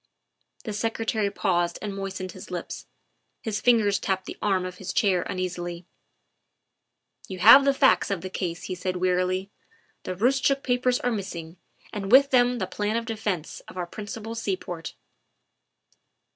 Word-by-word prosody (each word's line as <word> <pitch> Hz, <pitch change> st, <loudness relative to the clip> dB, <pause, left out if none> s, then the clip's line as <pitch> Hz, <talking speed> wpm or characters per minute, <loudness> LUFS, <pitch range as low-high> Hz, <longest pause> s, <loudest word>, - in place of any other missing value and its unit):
' -, -, -55 dB
' -, -, -28 dB
The 215 Hz, -, -3 dB
Secretary 220 Hz, -1 st, -1 dB
paused 175 Hz, -4 st, 0 dB
and 205 Hz, -2 st, -5 dB
moistened 195 Hz, -1 st, -5 dB
his 185 Hz, -, -11 dB
lips; 180 Hz, -2 st, -6 dB, 0.6 s
his 215 Hz, -2 st, -2 dB
fingers 215 Hz, -5 st, +4 dB
tapped 190 Hz, -1 st, -1 dB
the -, -, -7 dB
arm 190 Hz, -3 st, +1 dB
of 180 Hz, 0 st, -7 dB
his 180 Hz, -2 st, -5 dB
chair 190 Hz, -4 st, +3 dB
uneasily. 175 Hz, -1 st, -4 dB, 0.7 s
" -, -, -28 dB
You 190 Hz, -, -5 dB
have 275 Hz, +9 st, +9 dB
the 275 Hz, -, +4 dB
facts 270 Hz, 0 st, +4 dB
of 195 Hz, -4 st, -2 dB
the 185 Hz, -, -5 dB
case," 175 Hz, -3 st, -3 dB
he 185 Hz, -, -4 dB
said 185 Hz, +1 st, -3 dB
wearily; 185 Hz, +2 st, 0 dB, 0.3 s
" -, -, -39 dB
the 185 Hz, -, -3 dB
Roostchook 270 Hz, +6 st, +2 dB
papers 250 Hz, 0 st, +1 dB
are 245 Hz, -, 0 dB
missing, 180 Hz, -5 st, -5 dB, 0.4 s
and 200 Hz, -2 st, -4 dB
with 275 Hz, +2 st, +7 dB
them 245 Hz, -1 st, +4 dB
the -, -, -1 dB
plan 210 Hz, +1 st, -2 dB
of 230 Hz, -, -3 dB
defence 210 Hz, -7 st, -3 dB
of -, -, -11 dB
our 180 Hz, -, -2 dB
principal 215 Hz, +4 st, -7 dB
seaport." 185 Hz, -6 st, -4 dB
195 Hz, 170 wpm, -26 LUFS, 180-225 Hz, 0.7 s, have